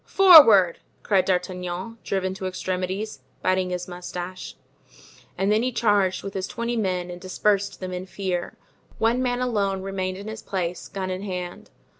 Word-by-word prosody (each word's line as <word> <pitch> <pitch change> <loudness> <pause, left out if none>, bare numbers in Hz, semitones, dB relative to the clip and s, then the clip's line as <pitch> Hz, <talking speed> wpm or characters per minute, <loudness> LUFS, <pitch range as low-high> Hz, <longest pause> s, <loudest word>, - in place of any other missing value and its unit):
"Forward!" 255 - +7 0.2
cried 195 -3 +2
D'Artagnan, 180 +3 -3
driven 190 -1 -1
to 190 0 -5
extremities, 185 +1 -3 0.2
biting 185 0 +1
his 180 0 -4
moustache; 180 0 -7 0.8
and 195 +2 +1
then 215 +1 +3
he 255 +1 0
charged 205 -5 +1
with 195 - -6
his 190 -1 -3
twenty 235 0 -3
men 185 -5 -1
and 175 0 -9
dispersed 200 +2 0
them 185 -1 -5
in 180 +1 -5
fear. 185 -2 -3 0.4
One 230 +3 +2
man 250 -1 0
alone 200 -6 0
remained 185 -1 -3
in 200 +2 -8
his 220 0 -6
place, 180 -2 -3
gun 190 -1 -4
in 185 +1 -4
hand. 180 -3 -6
190 Hz, 160 wpm, -24 LUFS, 180-210 Hz, 0.8 s, Forward